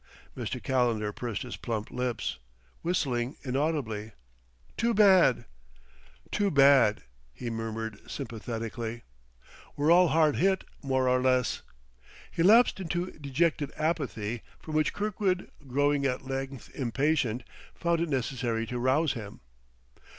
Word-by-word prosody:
'" - - -28
Mr. - - -3
Calendar 115 -5 +1
pursed 120 +1 -4
his 125 - -6
plump 110 -3 -4
lips, 125 -2 -2 0.4
whistling 135 -8 -1
inaudibly. 130 -6 -2 0.6
"Too 235 0 +1
bad, 190 - +5 0.9
too 205 -1 +1
bad!" 135 - +5 0.3
he 120 -2 -5
murmured 110 -1 -5
sympathetically. 115 -2 -5 0.7
"We're 145 +3 +2
all 180 +1 +7
hard 155 -2 +3
hit, 190 +1 +2 0.2
more 130 -2 +1
or 125 0 +3
less." 130 -2 +2 0.7
He - - -2
lapsed 215 +4 +6
into 175 0 -2
dejected 145 +1 0
apathy, 125 -9 -2 0.2
from 155 - -8
which 155 -1 +2
Kirkwood, 200 -3 -1 0.2
growing 145 +1 +2
at 130 0 -3
length 135 0 -5
impatient, 130 -2 0 0.3
found 170 -1 0
it 170 - -1
necessary 120 -3 -1
to 125 +2 -4
rouse 135 +5 +2
him. 105 -4 -8
135 Hz, 120 wpm, -29 LUFS, 120-160 Hz, 0.9 s, all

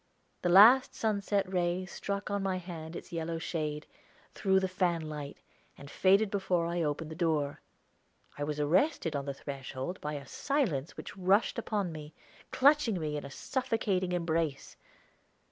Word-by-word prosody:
The 175 - +1
last 225 +9 +7
sunset 200 -2 0
ray 180 0 0
struck 200 +2 -4
on 200 0 0
my 190 -1 0
hand 170 -2 -7
its - - -8
yellow 165 0 -3
shade, 155 -2 -3 0.5
through 190 -2 +2
the 190 - 0
fan 180 -3 0
light, 150 -2 -6 0.4
and 140 0 -11
faded 195 +2 +3
before 185 -4 0
I 170 +1 -1
opened 155 +1 -2
the - - -6
door. 155 -4 0 0.7
I 145 - -4
was 150 0 -3
arrested 170 - +2
on 140 -1 -2
the 140 -1 -4
threshold 135 +4 -6
by 150 0 -3
a 140 -2 -6
silence 185 - -1
which - - -8
rushed 195 +5 +2
upon 205 -6 -2
me, 155 -1 -9 0.3
clutching 275 -8 +4
me 150 -2 -2
in 150 - -4
a 140 - -7
suffocating 220 - -1
embrace. 165 -4 -1
175 Hz, 160 wpm, -31 LUFS, 150-195 Hz, 0.7 s, last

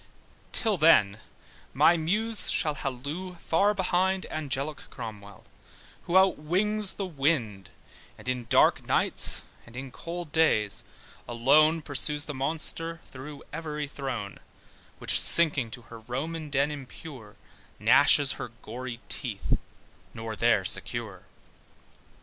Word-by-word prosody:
Till 220 -4 0
then 110 -11 +5 0.6
my 175 - +5
muse 210 +7 -1
shall 150 - +2
hollo 145 +6 -5
far 195 +5 +1
behind 190 0 +1
Angelic 145 -1 -3
Cromwell 105 -4 -9 0.6
who 175 - +3
outwings 190 +3 +2
the 195 - -4
wind, 135 - -1 0.5
And - - -14
in 125 -1 -2
dark - - +4
nights, - - 0 0.2
and 120 - -14
in 130 +1 -7
cold 170 +2 -7
days 110 -11 +1 0.4
alone 150 +7 +3
Pursues 145 +1 +2
the 150 - -5
monster 165 +4 0
through 140 +2 -9
every 150 -2 -4
throne: 130 -9 -5 0.6
Which - - -2
shrinking 150 -8 +3
to 120 +1 -10
her 115 +1 -12
Roman 150 +7 -5
den 140 +1 +1
impure, 135 -5 -10 0.4
Gnashes 145 -2 +5
her - - -4 0.2
gory 120 +1 -7
teeth; 110 -8 -1 0.6
nor 110 -1 -5
there - - +2
secure. - - -1
145 Hz, 115 wpm, -27 LUFS, 125-165 Hz, 0.6 s, then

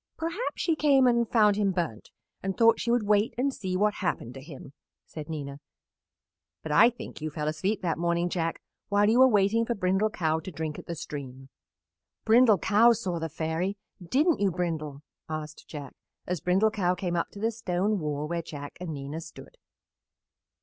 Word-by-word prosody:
"Perhaps 335 +9 -3
she 330 - +2
came 280 -4 +4
and 235 -2 +3
found 210 -3 +4
him 205 -2 +2
burnt 165 - -3 0.3
and 195 0 -3
thought 230 0 +5
she 235 - -2
would 235 -2 +2
wait 210 +1 +2
and 270 +2 +1
see 185 -5 -3
what 210 +2 +2
happened 165 - -3
to 135 - -9
him," 140 -1 -11 0.3
said 155 0 -9
Nina, 140 -3 -5 1.0
"but - - -5
I 230 +10 +7
think 240 -9 -10
you 155 - -2
fell 150 0 -4
asleep 190 +6 -1
that 165 -2 -1
morning, 170 0 +1
Jack, 165 -2 -2 0.3
while 205 0 +3
you 230 +3 +4
were 260 - +8
waiting 215 0 +3
for 235 +1 -2
Brindle 190 +2 +1
Cow 160 -6 0
to 160 - -8
drink 155 -1 -4
at - - -12
the 170 - -4
stream." 135 -4 -8 0.8
"Brindle 225 -1 +6
Cow 210 +7 +5
saw 190 -7 -3
the 165 0 -3
Fairy. 165 +6 -2 0.3
Didn't 290 - +2
you, 200 -1 +3
Brindle?" 160 -5 -3 0.3
asked 155 -1 -6
Jack, 145 -4 -8 0.3
as 180 -4 -3
Brindle 190 +5 +3
Cow 185 -4 +1
came 180 -1 -2
up 170 - -1
to 200 - -11
the 225 +2 0
stone 205 -2 -1
wall 150 -1 -3
where 170 +1 -2
Jack 145 -3 -9
and 165 -4 -4
Nina 140 +3 -6
stood. 165 - -12
180 Hz, 190 wpm, -28 LUFS, 155-215 Hz, 1.0 s, were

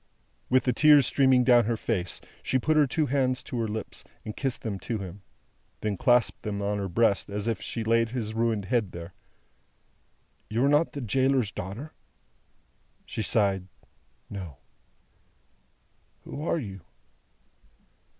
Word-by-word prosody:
With 130 0 +4
the 125 - +1
tears 150 +1 +6
streaming 130 -1 +4
down 120 -2 +5
her 115 0 0
face, 95 -6 -1 0.2
she 130 - +1
put 155 +5 +1
her 150 -2 +5
two 155 +4 +1
hands 130 -2 0
to 125 - -4
her 115 - 0
lips, 110 +1 -5 0.2
and 110 - -5
kissed 135 -3 -3
them 100 -4 -3
to 115 +2 -3
him; 95 0 -8 0.6
then 105 -2 -1
clasped 120 +3 +3
them 105 -2 -3
on 100 0 -1
her 100 - -2
breast, 100 +2 +2
as 105 +2 -3
if 115 -4 -1
she 115 - -4
laid 115 +1 +2
his 110 -3 -3
ruined 115 -3 0
head 105 -2 0
there. 85 +1 -8 1.4
"You 115 +5 +1
are - - +4
not 150 +3 +3
the 140 - -5
gaoler's 130 -1 +1
daughter?" 115 - -7 1.1
She - - -4
sighed 100 -3 +1 0.6
"No." 90 -9 -7 1.7
"Who 145 - -7
are - - +2
you?" 100 - -6
115 Hz, 150 wpm, -27 LUFS, 100-130 Hz, 1.7 s, tears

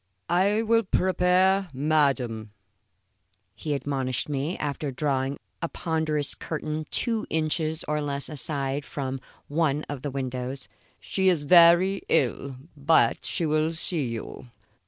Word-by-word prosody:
"I 200 +5 +2
will 230 +1 +3
prepare 185 0 +2
madam," 130 -7 0 1.0
he 150 +7 -3
admonished 135 -3 -2
me, 145 +4 -2
after 145 0 -3
drawing 135 0 -1 0.2
a 170 - -2
ponderous 155 -4 0
curtain 155 -1 -4
two 230 -3 -1
inches 160 0 0
or 150 0 -1
less 140 -1 -3
aside 140 -1 -1
from 135 -1 -5 0.3
one 150 -1 0
of 145 -3 -7
the 145 - -3
windows. 130 0 -4 0.3
"She 190 -1 +1
is 165 -5 +1
very 175 +4 +6
ill, 135 -2 0 0.2
but 150 +3 +3
she 170 - -2
will 155 +1 +1
see 160 -3 +2
you." 115 +1 -7
150 Hz, 125 wpm, -26 LUFS, 135-170 Hz, 1.0 s, very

